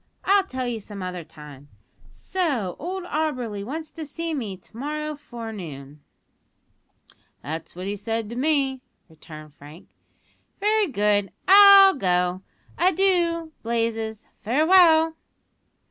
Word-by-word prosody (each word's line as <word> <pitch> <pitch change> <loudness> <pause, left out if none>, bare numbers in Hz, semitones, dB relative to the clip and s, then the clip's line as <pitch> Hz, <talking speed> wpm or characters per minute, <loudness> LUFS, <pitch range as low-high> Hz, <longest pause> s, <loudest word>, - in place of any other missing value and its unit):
I'll 395 0 +4
tell 255 -4 -4
you 235 -2 -3
some 200 -2 -9
other 180 -1 -5
time. 150 -3 -14 0.4
So 240 - -2
old 370 +4 -5
Auberly 255 - -3
wants 310 +7 -6
to 325 - -8
see 330 +2 -5
me 220 -10 -4
to 180 - -22
morrow 300 +4 -4
forenoon?" 195 - -9 1.4
"That's 160 +3 -7
what 180 +1 -7
he 200 +1 -3
said 225 +2 -3
to - - -6
me," 270 -1 0 0.3
returned 155 -2 -13
Frank. 150 +5 -15 0.7
"Very 425 +1 +2
good; 205 - +1 0.2
I'll 395 0 +9
go. 180 -5 0 0.4
Adoo, 350 -3 +1
Blazes 225 -1 -2
farewell." 320 - +4
240 Hz, 115 wpm, -24 LUFS, -, 1.4 s, I'll